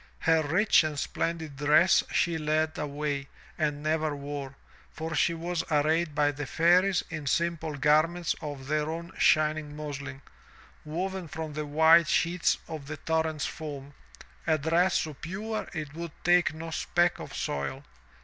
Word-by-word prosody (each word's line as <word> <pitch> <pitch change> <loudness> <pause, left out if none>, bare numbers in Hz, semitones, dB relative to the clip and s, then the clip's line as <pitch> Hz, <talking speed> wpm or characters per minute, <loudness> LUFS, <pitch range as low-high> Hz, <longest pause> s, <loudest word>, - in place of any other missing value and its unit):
Her 160 0 +4
rich 175 +7 +4
and 155 -2 -3
splendid 160 -1 -3
dress 150 +5 +5
she 165 -1 +1
laid 155 +1 0
away 145 -1 -3 0.3
and 150 -2 -1
never 155 -1 0
wore, 140 -1 -6 0.3
for 160 +1 -5
she 170 +3 +2
was 170 +1 -2
arrayed 155 +1 +1
by 145 0 +3
the 145 -1 -6
Fairies 175 +8 +3
in 155 -3 -5
simple 165 0 -1
garments 155 +4 +2
of 145 -4 -6
their 150 +2 0
own 170 +1 -5
shining 155 -1 +2
muslin, 145 -2 -6 0.6
woven 180 +3 -3
from 160 0 -6
the 150 0 -4
white 160 +3 +6
sheets 170 +1 +2
of 150 -3 -7
the 155 +1 -5
torrent's 160 -2 -1
foam, 145 -2 -7 0.5
a 160 - +3
dress 165 +5 +2
so 155 - -5
pure 200 +9 -5
it 155 -4 -5
would 170 -1 -6
take 175 -1 +4
no 160 +1 -7
speck 175 +2 +1
of - - -8
soil. 70 -1 -3
155 Hz, 150 wpm, -28 LUFS, 145-170 Hz, 0.6 s, white